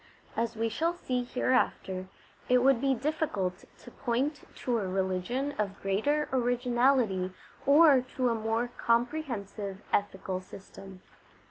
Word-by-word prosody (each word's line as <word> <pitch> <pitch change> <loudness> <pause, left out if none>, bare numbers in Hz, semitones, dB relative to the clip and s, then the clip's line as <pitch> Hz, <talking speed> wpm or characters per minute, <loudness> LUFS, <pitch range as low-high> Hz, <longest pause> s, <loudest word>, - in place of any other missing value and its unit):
As 230 0 -1
we 225 +1 0
shall 325 +10 0
see 255 -7 -2
INTRODUCTION - - 0
Iv - - -19 0.7
hereafter, 185 - -9 0.4
it 250 0 +5
would 265 -3 +4
be 270 -1 +2
difficult 240 - -2
to 245 - -13
point 265 +7 -1
to 240 -2 -1
a 195 - -2
religion 190 +9 -1
of 200 -2 -2
greater 255 +11 +1
originality 245 -5 +2 0.4
or 285 -2 +7
to 255 -2 +2
a - - +2
more 225 +2 -1
comprehensive 230 -6 -1
ethical 190 -2 0
system. 195 0 -12
235 Hz, 135 wpm, -30 LUFS, 195-265 Hz, 0.7 s, or